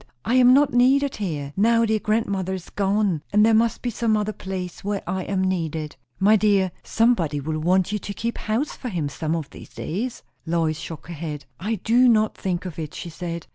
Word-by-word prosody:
I 235 - 0
am 250 -1 +7
not 280 +1 +4
needed 265 +3 +3
here, 150 -8 -4
now 230 +3 +4
dear 220 -1 +1
grandmother 200 -4 -1
is 185 - -9
gone; 200 -4 +1
and 210 +1 +5
there 225 - +4
must 230 +1 +2
be 245 - -1
some 220 -1 +1
other 210 0 -1
place 185 -3 -6
where 205 0 -2
I 185 +1 -3
am 190 -1 0
needed." 160 -5 -2 0.2
"My 210 +3 +5
dear, 200 -3 +3
somebody 185 -11 +1
will 155 +2 -3
want 180 +4 +2
you 210 - -1
to 200 - -6
keep 235 +4 -3
house 230 +8 -1
for 250 - -6
him, 165 -8 -2
some 155 +3 -2
of 155 -4 -5
these - - -12
days." 230 +9 -4 0.2
Lois 165 -2 0
shook 165 -3 -8
her 175 - -7
head. 150 -3 -6
"I 215 +5 -1
do 240 +5 +4
not 215 -2 +3
think 185 -1 -3
of 170 -3 -6
it," 155 -2 -6
she 170 - -6
said. 170 0 -5
195 Hz, 215 wpm, -23 LUFS, 170-220 Hz, 0.2 s, am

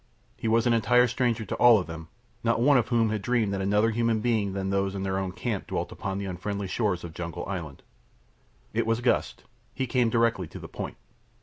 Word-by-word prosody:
He - - -4
was 115 +1 +3
an 120 - +4
entire 120 +2 +4
stranger 120 -2 0
to - - -3
all 120 -2 +7
of 95 - -2
them, 80 -1 -8 0.4
not 115 0 +2
one 140 +4 +5
of 120 -2 +3
whom 115 -3 +2
had 105 -2 -2
dreamed 110 -2 +1
that 95 - -2
another 105 +3 +2
human 115 0 +1
being 105 -4 0
than 95 0 -2
those 100 0 0
of 95 - -3
their 95 0 -1
own 95 -1 -3
camp 105 +2 -3
dwelt - - -3
upon 95 0 -4
the 100 - -3
unfriendly 100 +2 -4
shores 95 -3 -1
of 85 -2 -7
Jungle 85 -1 -5
Island. 85 -8 -6 0.9
It - - 0
was 115 +1 +1
Gust. 120 - 0 0.3
He 130 - -1
came 125 -1 +2
directly 115 -6 +1
to - - -10
the - - -8
point. - - -6
110 Hz, 220 wpm, -27 LUFS, 95-115 Hz, 0.9 s, all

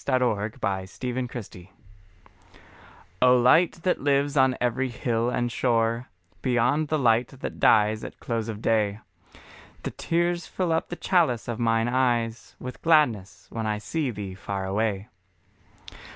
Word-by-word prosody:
LI 130 -2 +3
THE 125 - +2 0.4
LIGHT 95 +3 -3
INVISIBLE 120 -7 -5 1.5
O 125 0 +6
LIGHT 160 +8 +5
that 185 - +1
lives 140 +1 +1
on 130 -2 +3
every 125 +2 0
hill 120 -1 -1
and 120 -1 -1
shore, 115 0 0 0.3
Beyond 130 +4 +1
the 155 - 0
light 120 -3 +3
that 135 - -8
dies 110 +1 +4
at - - -9
close 115 -2 -3
of 110 0 -6
day, 105 -2 +1 0.8
The - - -3
tears 175 +1 -1
fill 180 -3 -2
up 160 - 0
the 175 - -4
chalice 165 - +1
of 120 -1 -4
mine 115 0 +2
eyes 120 -2 0
With 125 0 -8
gladness, 120 - +2
when 115 -1 -3
I 105 0 0
see 145 +6 -2
Thee 100 -4 -6
far 95 0 -4
away. 100 +1 -1
120 Hz, 145 wpm, -26 LUFS, 110-135 Hz, 1.5 s, O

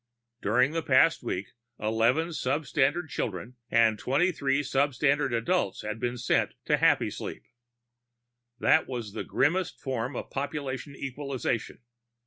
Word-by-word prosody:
During 125 +7 +3
the 165 +1 -1
past 145 +3 +4
week, 100 -5 -4 0.3
eleven 115 +9 +2
substandard 150 +2 0
children 115 +3 -4
and 115 -2 +3
twenty 150 +8 +2
three 140 -3 0
substandard 140 0 +1
adults 120 - 0
had 105 +1 -4
been 120 +1 -2
sent - - +1
on - - -39
to - - +3
Happysleep. - - +1 1.1
That 155 +4 +3
was 120 -6 -5
the - - -4
grimmest 180 +6 0
form 130 -1 -3
of - - -6
population 140 0 -4
equalization. 135 -4 -3
135 Hz, 125 wpm, -28 LUFS, 115-145 Hz, 1.1 s, past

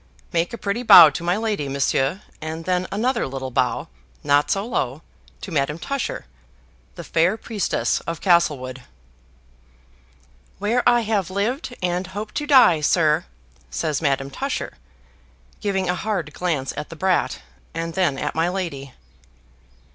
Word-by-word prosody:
"Make 170 0 +1
a 235 - -5
pretty 205 +3 -2
bow 165 -10 +10
to 165 +5 -5
my 175 +3 +1
lady, 210 -10 -2
Monsieur; 140 +5 0 0.2
and 160 +1 -5
then 180 0 0
another 235 - 0
little 130 -1 -5
bow, - - 0 0.4
not 145 +1 +3
so 195 +1 0
low, 150 - -2 0.4
to 195 - -7
Madame 150 0 0
Tusher 275 +8 -4 0.7
the - - -7
fair 170 +6 +1
priestess 220 -4 -1
of 165 -1 -3
Castlewood." 145 -8 +1 1.8
"Where 225 +5 +1
I 240 0 +4
have 210 -5 -1
lived 240 +7 -2
and 180 +1 -1
hope 210 +3 -6
to 295 - -3
die, 255 - +6
sir," 155 +1 +2 0.4
says 145 - -2
Madame 135 -2 0
Tusher, 275 - -3 0.9
giving 190 -3 -1
a 180 - +1
hard 180 -5 -3
glance 155 -7 -2
at - - -6
the 165 - -9
brat, 185 +2 0 0.3
and 165 0 -3
then 170 -6 +1
at 150 - -2
my 165 +2 +1
lady. 145 -8 -5
175 Hz, 145 wpm, -22 LUFS, 150-205 Hz, 1.8 s, bow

